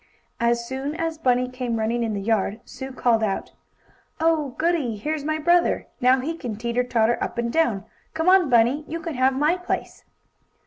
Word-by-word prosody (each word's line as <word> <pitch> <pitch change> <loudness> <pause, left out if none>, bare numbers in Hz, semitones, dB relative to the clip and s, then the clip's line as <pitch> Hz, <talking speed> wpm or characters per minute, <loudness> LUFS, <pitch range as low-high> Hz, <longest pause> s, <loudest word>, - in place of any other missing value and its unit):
As 235 0 +1
soon 270 +4 -4
as 325 -1 -3
Bunny 250 -3 +2
came 250 -2 -3
running 225 +2 0
in 225 -2 -1
the 200 - -3
yard, 215 0 0
Sue 265 0 -8
called 240 -3 +2
out: 200 -3 -2 0.7
"Oh, 315 -5 +1
goodie! 315 -9 0
Here's 300 +7 -3
my 310 +1 -1
brother. 345 +3 +2 0.2
Now 255 +1 +4
he 320 +5 -3
can 240 -9 -5
teeter 235 +3 -1
tauter 240 -1 +1
up - - -5
and 235 0 -1
down. 235 - +1 0.3
Come 320 +2 -1
on, 370 -4 +5
Bunny, 245 +5 +3
you 330 - -4
can 330 0 -5
have 260 0 +2
my 300 +6 +2
place!" 360 - -4
255 Hz, 185 wpm, -24 LUFS, 235-315 Hz, 0.7 s, on